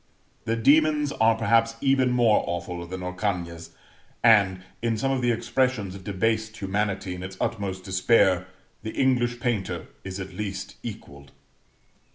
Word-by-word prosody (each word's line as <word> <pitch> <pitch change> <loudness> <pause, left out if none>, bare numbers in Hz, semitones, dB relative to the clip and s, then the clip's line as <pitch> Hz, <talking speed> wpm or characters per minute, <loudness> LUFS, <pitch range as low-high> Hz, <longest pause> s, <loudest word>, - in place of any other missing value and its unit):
The 115 0 0
demons 150 +4 +3
are 115 -2 +3
perhaps 115 +1 +2
even 135 -1 +3
more 120 -3 +3
awful 85 0 -4
than 90 +1 -6
Orcagna's; 90 -3 -3 0.5
and, 100 -5 +5 0.2
in 115 -1 0
some 135 +5 0
of 135 -1 0
the 120 - +2
expressions 120 -3 0
of 95 -1 -10
debased 110 +3 -1
humanity 100 -1 -2
in 90 - -7
its 95 0 -7
utmost 100 -5 -2
despair, 95 -1 +3 0.3
the 110 - -6
English 120 -2 +2
painter 115 -5 -2 0.2
is 95 0 -6
at 95 0 -7
least 100 0 -5
equalled. 70 0 -9
105 Hz, 145 wpm, -25 LUFS, 95-120 Hz, 0.5 s, and